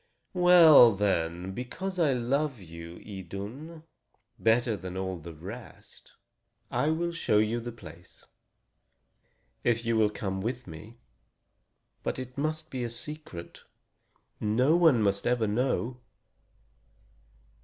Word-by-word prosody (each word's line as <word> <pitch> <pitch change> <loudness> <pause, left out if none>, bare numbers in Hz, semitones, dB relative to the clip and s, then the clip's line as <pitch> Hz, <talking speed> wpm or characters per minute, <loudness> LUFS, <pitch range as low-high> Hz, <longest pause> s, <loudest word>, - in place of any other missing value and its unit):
"Well, 170 - +8
then, 90 -2 -1
because 180 - -5
I 150 -5 +3
love 135 +2 -1
you, 85 -1 -10
Idun, 105 - -8 0.6
better 115 0 +2
than 95 -2 -7
all 95 -2 -3
the 85 0 -10
rest, 100 +9 -11 0.6
I 125 +5 +1
will 170 +2 0
show 165 -10 +1
you 110 +2 +2
the 120 +1 -6
place, 90 -6 -14 1.4
if 115 -1 +1
you 115 0 +1
will 110 -1 +4
come 95 -2 -4
with 120 +4 -3
me. 105 +8 -11 1.0
But - - -3
it 130 0 -7
must 155 +2 -3
be 130 -2 -3
a 120 - -2
secret 120 - -8 0.8
no 125 +9 +2
one 160 -10 +5
must 100 -1 +1
ever 120 -2 +2
know." 125 +2 -1
115 Hz, 120 wpm, -28 LUFS, 95-135 Hz, 1.4 s, Well